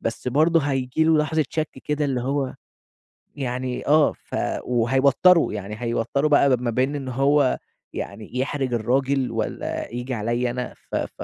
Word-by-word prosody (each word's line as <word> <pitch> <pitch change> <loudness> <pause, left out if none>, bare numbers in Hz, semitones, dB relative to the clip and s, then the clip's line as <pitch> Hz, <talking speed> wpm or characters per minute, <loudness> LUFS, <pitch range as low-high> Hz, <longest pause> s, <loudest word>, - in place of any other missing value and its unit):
بس 115 +2 -3
برضه 160 +5 +3
هييجي 135 +1 0
له 160 -1 +4
لحظة 155 +1 +1
شَك 155 -1 -1 0.2
كده، 150 0 -1
اللي 130 -3 0
هو 135 +1 -1 0.8
يعني 130 -2 -3
آه، 150 0 +5
ف - - -10 0.3
وهيوتره، 135 +8 +4
يعني 105 0 -5
هيوتره 120 +5 0
بقى 140 -3 +4
ب 120 - -10
ما 120 -1 -1
بين 130 +5 0
إن 135 -2 -4
هو 135 +1 +2 0.4
يعني 105 +4 -6
يحرِج 135 -1 -1
الراجل، 130 +2 +1
والّا 115 -2 -3
ييجي 125 +2 -4
عليّا 120 +2 -1
أنا، 125 0 -4 0.2
ف - - -2
ف - - -3
130 Hz, 160 wpm, -23 LUFS, 120-145 Hz, 0.8 s, آه